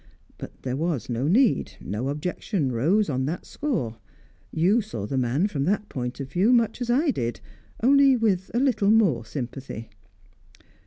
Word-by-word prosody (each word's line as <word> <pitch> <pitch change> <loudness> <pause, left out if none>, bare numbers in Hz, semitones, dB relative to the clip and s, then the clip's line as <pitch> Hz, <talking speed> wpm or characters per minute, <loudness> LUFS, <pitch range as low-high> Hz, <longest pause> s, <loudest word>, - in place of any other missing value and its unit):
But - - -10
there 130 -1 -2
was 150 -6 -2
no 120 +4 -1
need; 225 - +3
no 110 +8 -3
objection 150 - -2
rose 170 - +2
on 130 -3 -1
that 170 +4 -4
score; 170 - -3 0.5
you 190 +9 +3
saw 155 - -6
the 135 - -4
man, 130 +7 +1
from 145 -9 -1
that 205 +2 0
point 125 0 -4
of 135 -1 -6
view, 190 - +3
much 235 -1 +2
as 240 - -3
I 280 +5 +3
did 120 - -3 0.4
only 275 +1 +6
with 200 -6 0
a - - +3
little 250 -7 +2
more 190 - +3
sympathy. 125 -2 -6
170 Hz, 165 wpm, -25 LUFS, -, 0.5 s, only